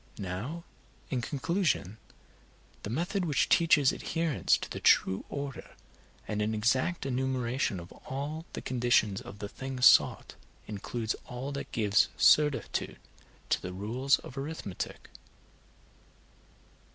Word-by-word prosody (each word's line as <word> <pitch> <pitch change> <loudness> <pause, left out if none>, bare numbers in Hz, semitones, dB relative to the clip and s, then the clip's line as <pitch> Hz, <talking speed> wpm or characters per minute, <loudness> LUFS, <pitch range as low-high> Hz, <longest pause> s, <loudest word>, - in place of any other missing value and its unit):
Now, 105 - -5 0.5
in 130 -3 0
conclusion, 145 - -1 0.8
the - - -6
method 175 - -1
which 150 -5 +1
teaches 160 -5 +5
adherence 165 -4 +1
to - - -6
the - - -6
true 95 - +3
order, 140 -2 -6 0.5
and 105 0 -2
an 110 +1 0
exact 130 +9 +1
enumeration 130 -5 -1
of 85 +2 -11
all 150 +5 -6
the - - -6
conditions 120 -5 +2
of 100 - -10
the 105 - -5
thing 130 +4 -6
sought - - +5 0.3
includes 110 +2 -3
all 125 +3 -5
that 140 0 -6
gives 105 0 +3
certitude 150 -2 +3 0.5
to - - +2
the 90 - -6
rules 120 +8 +1
of 135 - -9
arithmetic. 140 - -6
130 Hz, 120 wpm, -30 LUFS, 105-145 Hz, 0.8 s, teaches